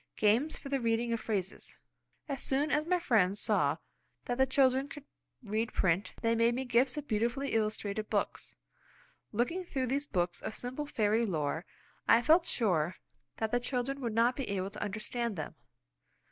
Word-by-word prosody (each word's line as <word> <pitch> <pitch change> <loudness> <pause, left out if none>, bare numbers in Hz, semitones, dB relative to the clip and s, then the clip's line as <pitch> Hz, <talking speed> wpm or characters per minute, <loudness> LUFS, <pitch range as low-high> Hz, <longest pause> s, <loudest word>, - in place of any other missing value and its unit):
Games 230 +9 +3
for 275 - -8
the 275 -1 +1
Reading 230 0 +1
of 230 - 0
Phrases. 195 -5 -3 0.5
As 275 -2 -3
soon 285 +3 +1
as 300 +2 +1
my 360 +1 +3
friends 205 - +2
saw - - +2 0.5
that 245 +1 -2
the 265 - +5
children 265 0 +3
could 290 0 -9 0.4
read 220 +1 -1
print, 185 +1 +1
they 230 0 +3
made 230 +1 +3
me 265 +1 -2
gifts 250 +3 +2
of 295 -1 -4
beautifully 240 +5 0
illustrated 215 -1 -1
books. - - -2 0.8
Looking 245 - 0
through 270 -7 -2
these 280 +3 -1
books 175 -5 -1
of - - -4
simple 260 +4 -3
fairy 220 -3 +2
lore, 155 -2 -2 0.4
I 230 +1 +6
felt 330 +4 +5
sure 180 -7 +1 0.4
that 220 -1 -1
the 245 - +3
children 265 +2 -2
would 235 -3 -2
not 235 +2 +4
be 270 -5 -4
able 195 -1 -2
to - - -7
understand 220 +2 -2
them. 155 -3 -5
235 Hz, 175 wpm, -32 LUFS, 210-270 Hz, 0.8 s, I